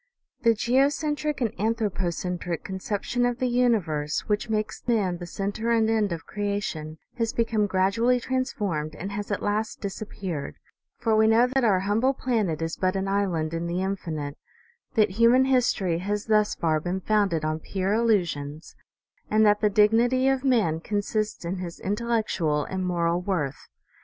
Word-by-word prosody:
The 230 -1 +4
geocentric 290 +5 +1
and 230 -4 0
anthropocentric 180 -6 -2
conception 205 +5 -2
of 245 -1 +1
the 255 - -1
universe, 210 -12 +1
which 210 +2 -2
makes 215 0 -2
man 195 -7 +1
the 175 - -7
center 200 +5 -3
and 225 -1 +3
end 215 -3 +1
of 165 -1 -5
creation, 200 -7 -3 0.2
has 230 -1 0
become 225 -3 +1
grad 190 0 +1
ually 245 +3 +2
transformed 205 - -2
and 195 +3 -6
has 205 0 -4
at 205 - -2
last 210 +1 -1
disappeared; 195 -6 -5 0.4
for 225 -3 +1
we 220 0 +5
know 225 +2 +5
that 260 +1 0
our 195 -5 +3
humble 225 +7 +1
planet 210 -13 -1
is 165 0 -3
but 185 0 0
an 195 0 -1
island 180 -6 0
in 165 +1 -2
the 170 - -3
infi 190 -2 -2
nite, 145 -2 -5 0.6
that 215 -3 +4
human 250 +3 +6
history 235 -10 +1
has 205 +3 -2
thus 215 -1 +2
far 155 -2 +1
been 180 +4 -3
founded 195 -7 +1
on 155 0 -1
pure 190 +4 -2
illusions, 170 -10 0 0.5
and 215 +1 +4
that 210 0 +4
the 210 - +4
dignity 230 +5 +3
of 270 -1 +1
man 220 - +2
consists 210 +1 -2
in 180 +3 -2
his 180 -1 -6
intellectual 205 -8 0
and 185 -1 -3
moral 170 0 +1
worth. 170 -8 -3
205 Hz, 165 wpm, -26 LUFS, 175-230 Hz, 0.6 s, human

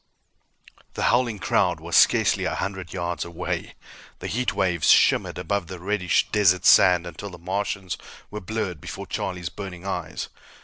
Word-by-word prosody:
The - - -2
howling 120 -3 +1
crowd 90 -3 +1
was 85 +2 -4
scarcely - - +4
a - - -1
hundred 95 -3 -4
yards 85 -1 -3
away. 85 -1 -5 0.4
The - - -10
heat 125 +2 -1
waves 90 -4 +1
shimmered - - +4
above 100 -4 -2
the 95 +1 -7
reddish 95 -1 +1
desert 95 -3 +3
sand 90 -2 +6
until 90 +4 -7
the 90 - -11
Martians 95 +1 -3 0.3
were 105 +1 -5
blurred 95 -5 -4
before - - -7
Charlie's 90 -2 -4
burning 95 -3 -8
eyes. 100 - -4
95 Hz, 150 wpm, -24 LUFS, 85-100 Hz, 0.4 s, sand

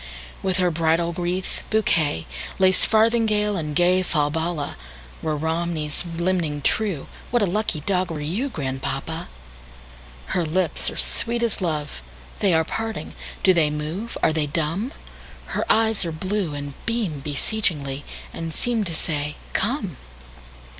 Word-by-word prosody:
With 190 -1 +1
her 180 -2 +3
bridal 165 +1 +2
wreath, 180 +2 -1
bouquet, 165 - +2 0.3
Lace 190 0 +6
farthingale, 220 -2 +3
and 155 -4 -2
gayFalbala, 165 -3 +2 0.5
Were 155 -1 0
Romney's 160 -1 -1
limning 170 -5 0
true, 195 -8 +1 0.2
What 240 -3 +3
a - - +5
lucky 190 -4 0
dog 185 +2 +1
were 160 -2 -3
you, 185 - -1
Grandpapa! 135 - -3 1.0
Her 180 - +2
lips 170 +2 +1
are - - -8
sweet 235 0 0
as 230 -3 +1
love; 150 - -2 0.4
They 195 - +3
are 160 -1 +4
parting! 220 -4 -3 0.3
Do 190 - +7
they 160 -4 +4
move? 155 +10 -4
Are 160 - +5
they 155 -2 +1
dumb? 165 - -1 0.6
Her - - +1
eyes 220 -2 +3
are 170 - -2
blue, 185 0 -1
and 145 0 -5
beamBeseechingly, 150 - 0 0.3
and 165 -1 -4
seemTo 215 -7 -1
say, 150 -2 -2 0.2
"Come!" - - 0
170 Hz, 130 wpm, -24 LUFS, 150-200 Hz, 1.0 s, Do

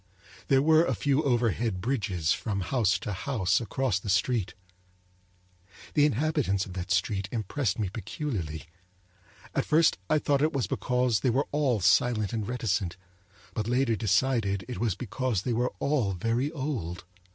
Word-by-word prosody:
There 135 0 +4
were 160 +1 +5
a - - 0
few 145 0 +1
overhead 120 -6 0
bridges 95 - -1
from 100 -4 -3
house 100 -4 +1
to 105 +3 -5
house 95 -2 0
across 115 -2 -1
the 100 - -7
street. 100 +3 +1 1.4
The 150 -1 +5
inhabitants 140 -8 0
of 95 - -9
that 90 0 -5
street 95 +1 0
impressed 115 0 -1
me 105 -3 -1
peculiarly; 95 - -4 0.9
At - - +1
first 160 +1 +3
I 155 - +4
thought 145 -2 +1
it 155 +1 +2
was 135 -4 0
because 125 -3 0
they 125 - +1
were 135 +4 +1
all 135 -7 +1
silent 110 +2 +3
and 110 -3 -2
reticent; 100 -7 -1 0.6
but 110 -1 -2
later 125 -1 +2
decided 100 -1 +1
it 125 -6 -5
was 110 -5 0
because 125 -3 -2
they 125 - -1
were 120 +2 0
all 130 -9 0
very 115 - -1
old. 130 - -4
115 Hz, 155 wpm, -28 LUFS, 100-135 Hz, 1.4 s, were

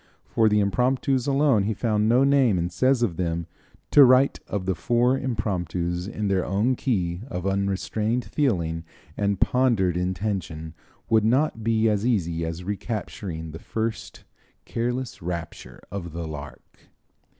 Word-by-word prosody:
For 110 -1 +2
the 105 0 +3
impromptus 125 +5 +1
alone 135 -7 +3
he 110 - 0
has - - -15
found 110 -2 +1
no 125 +3 +5
name 135 -7 +4
and 85 +1 -1
says 130 +6 +2
of 85 -8 -1
them: 85 -2 -1 0.5
"To 145 - +9
write 130 +1 +5
of 100 -3 -3
the 95 - +1
four 120 +9 +2
impromptus 90 - -2
in 105 -1 -3
their 95 -2 +1
own 105 +7 +1
key 90 -9 -1
of 90 -4 -5
unrestrained 100 +4 -1
feeling 85 - 0 0.3
and 100 -2 0
pondered 115 -9 +2
intention 90 -4 -3 0.3
would 110 -1 +3
not 120 +1 +1
be 115 0 +2
as 105 -2 +1
easy 85 -9 0
as 80 +2 -4
recapturing 95 -5 -5
the 80 - -8
first 110 +3 -4 0.4
'careless 120 -1 -3
rapture 85 -1 -6
of 85 -4 -6
the 85 -1 -4
lark.'" 75 -2 -10
105 Hz, 150 wpm, -25 LUFS, 90-120 Hz, 0.5 s, To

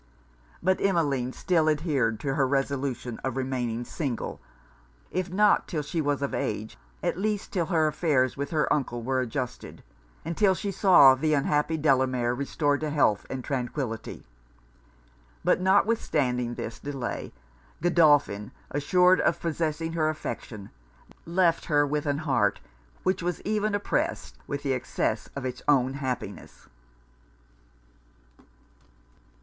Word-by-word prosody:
But 185 +1 +2
Emmeline 145 -10 +1
still 160 +1 +1
adhered 145 -8 0
to 135 -2 -1
her 135 -2 +2
resolution 135 -3 -2
of 130 -1 -2
remaining 125 -3 -2
single, 130 -6 -4 0.7
if 185 -1 -2
not 205 +2 +3
'till 155 -4 -2
she 160 +3 -2
was 145 -1 0
of 140 - -2
age, 110 +1 -3 0.3
at - - -1
least 210 0 -2
till 175 -5 0
her 160 -2 +2
affairs 145 -5 +1
with 140 0 -4
her 155 -2 +1
uncle 120 -5 -2
were 130 +2 0
adjusted, 125 0 -4 0.4
and 165 +1 -3
'till 195 -1 +4
she 200 +3 -3
saw 180 -9 +7
the 150 +3 +1
unhappy 150 +3 +1
Delamere 130 -5 +2
restored 145 +2 0
to 155 - -2
health 140 -9 +2
and 130 -1 -4
tranquillity. 125 -3 -4 1.2
But - - +2
notwithstanding 150 - +1
this 115 - -6
delay, 135 -4 -5 0.5
Godolphin, 145 -12 +3 0.2
assured 180 +6 +4
of - - +1
possessing 165 0 -2
her 155 -2 +1
affection, 110 -9 -6 0.6
left 170 -1 +2
her 145 -2 +3
with 150 +1 -2
an 145 0 +1
heart 145 -4 +1 0.4
which 185 0 +1
was 175 0 -2
even 215 0 0
oppressed 205 - -2
with 145 -1 -4
the 135 -2 +1
excess 120 -3 -2
of 140 -1 -4
it's 125 0 -4
own 135 -3 +3
happiness. 125 -7 -6
145 Hz, 135 wpm, -27 LUFS, 130-165 Hz, 1.2 s, saw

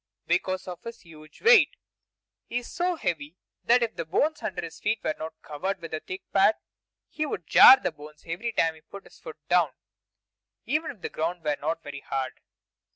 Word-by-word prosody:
Because 185 0 -1
of 180 -1 -7
his 230 0 -9
huge 155 -3 -16
weight! 470 +1 +6 0.7
He 240 - -2
is 245 - -5
so 355 0 0
heavy 160 - -3 0.3
that 240 +1 +5
if 230 - -2
the 170 - -3
bones 295 - 0
under 180 -3 -4
his 165 - -8
feet 215 +2 0
were 155 - 0
not 160 0 -7
covered 190 +6 -3
with 165 -2 -9
a 155 - -1
thick 185 +4 -8
pad, 200 +2 +5 0.5
he 310 - -3
would 180 - -5
jar 260 - +9
the 180 - -2
bones 150 0 -14
every 180 +8 -3
time 165 -7 +2
he 160 - -18
put 200 +5 -12
his - - -18
foot 470 -3 -10
down, - - +4 1.0
even 310 +1 0
if 215 - -9
the - - -4
ground 165 +2 -3
were 150 -1 +1
not 165 +3 -2
very 145 -1 -7
hard. 130 -2 -4
175 Hz, 200 wpm, -27 LUFS, 155-235 Hz, 1.0 s, jar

